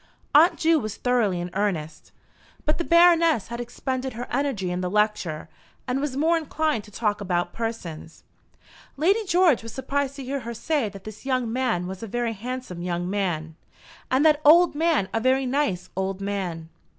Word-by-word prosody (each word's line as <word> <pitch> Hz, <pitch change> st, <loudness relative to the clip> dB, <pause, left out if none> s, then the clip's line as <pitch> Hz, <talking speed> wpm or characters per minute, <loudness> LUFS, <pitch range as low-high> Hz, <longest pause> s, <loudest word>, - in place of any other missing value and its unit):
Aunt 330 Hz, +4 st, +6 dB
Ju 325 Hz, 0 st, +3 dB
was 215 Hz, -4 st, -5 dB
thoroughly 230 Hz, -8 st, +1 dB
in 175 Hz, +1 st, -5 dB
earnest; 175 Hz, -6 st, -3 dB, 0.5 s
but 305 Hz, -, 0 dB
the -, -, 0 dB
Baroness 335 Hz, -, +4 dB
had 235 Hz, +1 st, -4 dB
expended 260 Hz, +2 st, -4 dB
her 240 Hz, +2 st, -5 dB
energy 245 Hz, -9 st, -1 dB
in 180 Hz, +1 st, -2 dB
the 180 Hz, -, -2 dB
lecture, 210 Hz, -6 st, 0 dB, 0.4 s
and 255 Hz, +2 st, -1 dB
was 280 Hz, -2 st, -3 dB
more 330 Hz, +3 st, +3 dB
inclined 310 Hz, -6 st, -1 dB
to 210 Hz, -, -15 dB
talk 210 Hz, -1 st, -1 dB
about 175 Hz, -2 st, -1 dB
persons. 195 Hz, -9 st, -6 dB, 0.7 s
Lady 390 Hz, +9 st, +2 dB
George 355 Hz, -7 st, +4 dB
was 230 Hz, 0 st, -9 dB
surprised 275 Hz, +1 st, -2 dB
to 275 Hz, -, -7 dB
hear 275 Hz, +2 st, -3 dB
her 235 Hz, -1 st, -6 dB
say 285 Hz, -4 st, -1 dB
that 195 Hz, -1 st, -12 dB
this 215 Hz, -1 st, -10 dB
young 255 Hz, -4 st, -1 dB
man 245 Hz, -9 st, 0 dB
was 190 Hz, +1 st, -7 dB
a 225 Hz, -, -5 dB
very 235 Hz, +2 st, -2 dB
handsome 235 Hz, -4 st, -6 dB
young 175 Hz, 0 st, -2 dB
man, 170 Hz, -6 st, -2 dB, 0.5 s
and 265 Hz, +4 st, +2 dB
that 305 Hz, -1 st, +5 dB
old 340 Hz, +4 st, +7 dB
man 310 Hz, -, +1 dB
a 225 Hz, -, +1 dB
very 260 Hz, +3 st, +2 dB
nice 250 Hz, -10 st, -1 dB
old 190 Hz, 0 st, -2 dB
man. 185 Hz, -5 st, -4 dB
235 Hz, 180 wpm, -25 LUFS, 190-285 Hz, 0.7 s, old